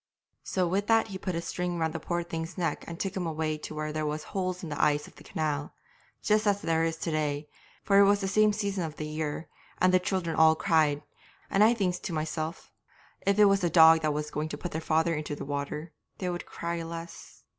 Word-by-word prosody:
'So 185 -2 0
with 195 +4 0
that 225 -1 +3
he 190 - -5
put 185 -3 -3
a 165 - -1
string 180 0 -2
round 160 -1 0
the 170 - -3
poor 175 0 -2
thing's 165 +1 -5
neck 175 -3 -1
and 170 +1 -7
took 195 - -2
him 180 -3 -2
away 155 -1 -1
to 155 0 -8
where 155 0 -3
there 155 0 -2
was 150 0 -2
holes 185 -1 -3
in 165 - -5
the 145 - -2
ice 150 0 +2
of - - -16
the - - -14
canal, 150 -2 -3 0.5
just 215 0 +2
as 205 -1 +3
there 165 0 +2
is 165 0 -1
to 165 - -3
day, 150 -1 -1 0.4
for 200 -1 +5
it 200 - +8
was 200 +1 +4
the 195 - -2
same 215 +2 +4
season 200 -3 -2
of 155 -2 -5
the 155 - -5
year, 155 +1 -4 0.3
and 185 0 +3
the 185 - +6
children 180 -3 -1
all 160 0 +6
cried; 155 -4 +2 0.5
and 195 - +3 0.2
thinks 185 -4 0
I - - -28
to 180 - -4
myself, 155 +1 -3 0.6
"If 200 0 +3
it 210 - +7
was 195 -1 +4
the 175 -3 +1
dog 160 -1 +7
that 155 -1 +1
was 150 0 -3
going 155 +1 -2
to - - -5
put 175 - -5
their 160 - -3
father 160 +1 +2
into 150 -1 -3
the 140 - -6
water 145 +3 -4 0.2
they 180 -2 -2
would 175 - -5
cry 170 0 -4
less." 165 +1 -8
165 Hz, 240 wpm, -29 LUFS, 155-185 Hz, 0.6 s, it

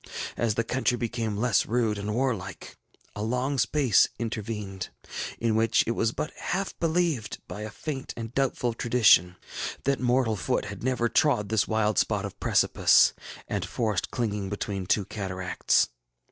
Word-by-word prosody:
As 115 -3 0
the 115 - +1
country 125 +1 0
became 115 -3 -2
less 115 -1 +2
rude 110 -2 +1
and 105 +1 -3
warlike, 115 -7 -2 0.4
a 105 - -4
long 125 +5 -1
space 125 0 +4
intervened, 105 -4 -4 0.5
in 115 -1 0
which 110 +1 +3
it - - 0
was 115 -1 +1
but 155 - -4
half 195 +1 -2
believed, 160 -9 0
by 105 - -7
a 110 - -4
faint 135 +4 -5
and 115 0 -6
doubtful 130 -3 0
tradition, 110 -7 +4 0.5
that 140 0 +1
mortal 125 -2 +2
foot 125 +6 -1
bad 100 -2 -7
never 125 -2 +1
trod 120 -6 +2
this 110 -2 +2
wild 110 -2 +1
spot - - 0
of - - -8
precipice - - +4 0.3
and - - -2
forest 105 -6 -1
clinging 105 -5 -2
between 100 -2 -4
two 100 +1 +2
cataracts. 95 -6 0
115 Hz, 155 wpm, -27 LUFS, 105-125 Hz, 0.5 s, space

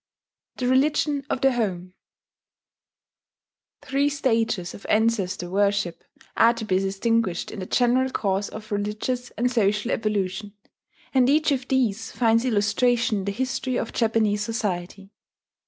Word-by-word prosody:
THE 250 - -1
RELIGION 285 +2 +1
OF 260 - -2
THE 270 - +4
HOME 185 -7 -2 1.9
Three 280 +1 +1
stages 225 -10 0
of - - -11
ancestor 215 -5 +1
worship 200 -2 0 0.3
are 235 +1 +5
to 230 -1 -5
be 185 -3 +1
distinguished 195 0 0
in - - -7
the 185 - -5
general 255 +1 +2
course 200 -4 -1
of 215 0 -10
religious 210 +5 -2
and 245 +3 +1
social 210 0 +1
evolution; 205 -2 -2 0.6
and 260 -1 +4
each 305 +1 +3
of 265 -2 -1
these 230 -5 0
finds 230 0 +2
illustration 230 +1 +2
in 190 - -5
the 200 - -1
history 260 +2 -2
of - - -3
Japanese 220 -3 +1
society. 195 -3 -4
225 Hz, 135 wpm, -24 LUFS, 200-250 Hz, 1.9 s, are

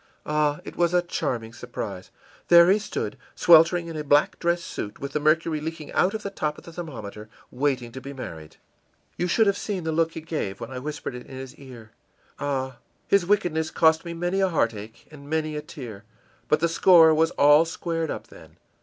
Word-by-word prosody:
Ah, 150 -1 0
it - - -8
was 175 0 +1
a 175 - +3
charming 115 -9 -3
surprise! 110 -6 -7 0.4
There 170 +1 +7
he 205 - +4
stood, 205 - -4 0.2
sweltering 170 +1 +6
in 165 - -7
a 155 - -3
black 145 +1 +3
dress 170 0 0
suit, 105 - -6
with 140 0 -5
the 150 - 0
mercury 155 +1 +1
leaking 160 -1 -6
out 190 +4 +2
of 215 - -5
the 200 - -4
top 150 -5 -2
of - - -13
the 170 - -12
thermometer, 110 - -8 0.2
waiting 130 -3 -1
to 130 - -8
be 135 +2 -8
married. 80 - -9 0.6
You 175 - -1
should 220 +6 +3
have 200 -1 +1
seen 195 -5 -3
the 160 - -1
look 165 +1 +1
he 160 - -6
gave 155 -12 -4
when 115 +1 -7
I 130 - -5
whispered 145 0 -5
it 125 - -9
in 135 - -10
his 130 -1 -8
ear. 120 -5 -13 0.5
Ah, 130 -3 -2 0.3
his 200 -3 +3
wickedness 160 -6 +1
cost 160 0 +3
me 170 -1 -6
many 175 +3 -1
a 190 - +3
heartache 115 - -2
and 145 -2 -13
many 155 -1 -1
a 150 - -3
tear, 120 -9 -9 0.4
but 150 - +2
the 170 - +3
score 165 -1 +6
was 160 +1 +3
all 145 +2 +7
squared 165 -1 -3
up, - - -5
then. - - -16
155 Hz, 205 wpm, -25 LUFS, 130-170 Hz, 0.6 s, There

